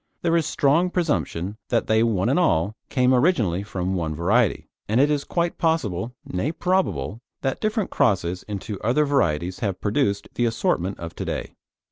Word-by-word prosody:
There 170 -1 +2
is 165 -2 +2
strong 160 +6 +2
presumption 110 - -1
that 115 - +1
they 110 0 +3
one 110 -4 +1
and 135 +8 +3
all 105 - +2
came 125 0 +3
originally 120 - +2
from 95 -2 -3
one 80 -4 -2
variety, 100 +7 +1 0.2
and 110 +3 +2
it 145 +2 +4
is 145 -1 0
quite 170 -1 -1
possible, 125 - 0
nay 90 +12 -2
probable, 115 - -1 0.2
that 135 -1 -2
different 215 -1 -1
crosses 95 -9 +1
into 100 0 -5
other 130 +7 +2
varieties 90 - 0
have 100 -6 -2
produced 100 -2 0
the 120 - +1
assortment 100 -5 0
of 85 -1 -7
to - - -3
day. - - -4
115 Hz, 170 wpm, -24 LUFS, 95-145 Hz, 0.2 s, it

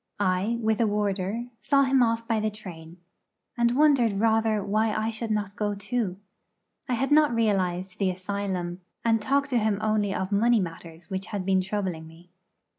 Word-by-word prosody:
I, 200 +4 +1
with 220 -1 +1
a 225 - +3
warder, 205 +2 -1 0.2
saw 275 0 +3
him 265 -1 +3
off 230 -1 +1
by 225 -2 +1
the 215 0 0
train, 175 -6 -11 0.6
and 235 +1 +2
wondered 275 -7 +4
rather 220 -1 +2
why 215 +2 +1
I 215 +1 -1
should 225 +1 -5
not 205 -2 -2
go 205 -1 -1
too. 205 -2 -2 0.7
I 250 - +2
had 270 +4 -1
not 295 -4 +5
realised 190 -3 0
the 195 -2 +2
asylum, 185 -1 -3 0.2
and 225 -1 +3
talked 280 +4 +1
to 245 - +3
him 215 -2 +1
only 215 -2 +1
of 190 0 -3
money 230 +3 +4
matters 165 -1 -7
which 190 0 -3
had 200 -3 -4
been 190 -1 +3
troubling 185 -4 -3
me. 170 +2 -17
210 Hz, 180 wpm, -26 LUFS, 190-230 Hz, 0.7 s, not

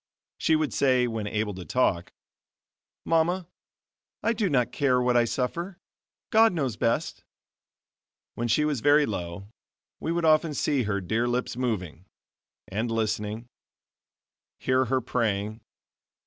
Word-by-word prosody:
She 160 - +3
would 155 -2 0
say, 130 -2 +3
when 110 -3 -3
able 105 0 -1
to 90 -1 -7
talk: 90 -6 0 0.9
"Mama, 165 +2 +1 0.8
I 230 - +2
do 215 -4 0
not 125 -5 +1
care 130 -3 +2
what 125 0 +2
I 120 -1 +5
suffer, 170 - -3 0.5
God 225 -1 +5
knows 135 -9 -1
best." 115 +2 -1 1.1
When 120 - -2
she 150 +7 +2
was 145 -6 -1
very 145 +2 +5
low, 95 -1 -5 0.5
we 160 - -2
would 170 0 0
often 155 -1 +3
see 140 -5 +1
her 100 -1 -1
dear 110 +6 0
lips 125 0 -1
moving, 95 -9 -3 0.6
and 110 +5 -2
listening, 110 0 -2 1.1
hear 130 0 +2
her 130 +1 0
praying. 110 -2 -1
125 Hz, 135 wpm, -26 LUFS, 110-150 Hz, 1.1 s, I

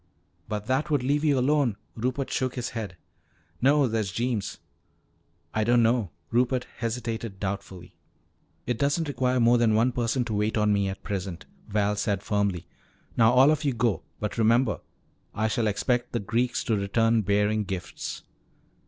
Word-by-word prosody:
"But 105 -1 -3
that 135 +6 0
would 145 -4 +1
leave 145 +3 +1
you 145 -3 +3
alone." 130 -4 +2 0.2
Rupert 125 +4 -2
shook 130 -1 -1
his 125 -2 -3
head. 105 -6 -6 0.6
"No. 140 +1 +4
There's 110 -4 -1
Jeems." 115 0 -2 1.0
"I 110 - +1
don't 120 +1 +4
know," 115 -4 +2 0.2
Rupert 125 +1 +1
hesitated 115 -3 -3
doubtfully. 95 -2 -5 0.7
"It 120 -2 -2
doesn't 145 +3 +1
require 130 -2 0
more 120 +1 +5
than 110 -2 +3
one 115 +3 +3
person 120 +1 0
to 115 - -4
wait 105 +2 0
on 105 -1 +3
me 100 -1 +1
at 95 0 -6
present," 95 -4 -4 0.2
Val 105 0 +1
said 100 -1 -1
firmly. 100 -4 0 0.5
"Now 115 0 +5
all 130 +4 +6
of 155 0 0
you 140 -3 +1
go. 115 -3 0 0.2
But 105 +2 -3
remember, 115 +1 +3 0.6
I 110 +2 +1
shall 110 +1 0
expect 120 +4 0
the 120 - 0
Greeks 115 +5 0
to 115 - +1
return 115 +3 +2
bearing 105 +2 +1
gifts." 95 -3 -5
115 Hz, 160 wpm, -26 LUFS, 105-125 Hz, 1.0 s, all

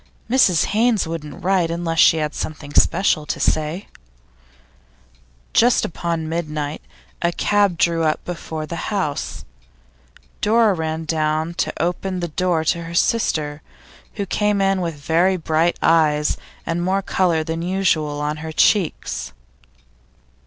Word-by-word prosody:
'Mrs 200 -10 +4
Haynes 225 -1 +2
wouldn't 155 -3 -7
write 185 -2 +2
unless 165 -1 -2
she 160 - +6
had 150 -1 -2
something 150 -2 -6
special 170 -4 +2
to - - -3
say. 155 +5 0 1.7
Just 240 +1 +4
upon 165 -1 -3
midnight, 155 -2 -3 0.4
a 170 - +2
cab 200 -1 +1
drew 165 0 +2
up 155 -1 0
before 160 -3 -5
the 170 +1 -5
house. 190 -9 -3 1.0
Dora 220 0 +4
ran 160 -1 -3
down 155 +1 0
to - - -1
open 180 +2 -2
the 175 -1 -3
door 175 0 0
to 170 +2 0
her 170 +1 -7
sister, 155 -8 0 0.5
who 200 - -2
came 210 +1 0
in 195 -1 +2
with 165 -3 -3
very 170 +6 +1
bright 160 +1 +1
eyes 150 -2 +3 0.3
and 165 +1 -1
more 190 +2 0
colour 175 -4 +1
than 165 +1 -4
usual 170 -5 0
on 150 +1 -2
her 160 +1 -6
cheeks. 175 - +1
165 Hz, 135 wpm, -21 LUFS, 155-185 Hz, 1.7 s, she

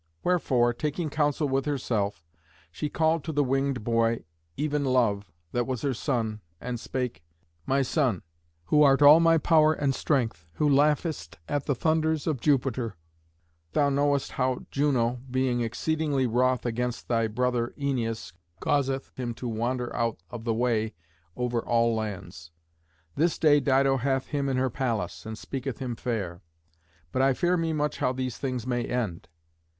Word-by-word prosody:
Wherefore, 130 -9 +2
taking 150 +4 -3
counsel 145 0 +1
with 135 0 0
herself, 105 - -1 0.5
she 150 - -3
called 160 0 +1
to 160 - -3
the 145 -1 +2
winged 135 -2 0
boy, 115 0 +1 0.3
even 150 0 0
Love, 115 -7 +1 0.2
that 120 -1 0
was 130 -3 -3
her 140 -2 +1
son, 110 -4 -2 0.2
and 125 -1 -4
spake, 125 -3 -3 0.5
"My 135 +1 +2
son, 130 - 0 0.4
who 150 - +4
art 140 0 +5
all 150 +3 +9
my 165 0 +5
power 155 -1 +4
and 140 -3 0
strength, 115 - -1
who 150 - +1
laughest 145 - +1
at 145 -2 -2
the 140 - +1
thunders 160 +2 +1
of 150 -7 -1
Jupiter, 130 -6 +1 0.8
thou 145 -1 +3
knowest 140 0 +1
how 130 -1 -1
Juno, 125 -4 +1
being 130 -1 +1
exceedingly 145 +3 0
wroth 125 +2 +1
against 120 +1 -2
thy 115 -2 +1
brother 120 +1 0
Æneas, 120 - -2 0.3
causeth 135 -2 0
him 120 -2 -3
to 125 - -5
wander 120 +2 -2
out 115 -1 0
of 115 -2 -7
the 115 - +1
way 110 -2 0 0.4
over 120 -1 -1
all 115 -1 +2
lands. 95 -7 -5 0.6
This 165 +2 +1
day 150 -2 +5
Dido 135 -1 +3
hath 135 +1 -1
him 140 -2 -1
in 130 - 0
her 130 -1 +1
palace, 105 -10 -2
and 110 0 -5
speaketh 135 +1 -5
him 125 -3 -4
fair; 100 -8 -3 0.7
but 130 - 0
I 135 -1 +3
fear 175 +5 +2
me 165 -2 0
much 150 -1 -1
how 125 - +2
these 130 -2 -4
things 130 -4 -3
may 120 -1 -1
end. 110 -10 -3
130 Hz, 160 wpm, -27 LUFS, 115-145 Hz, 0.8 s, all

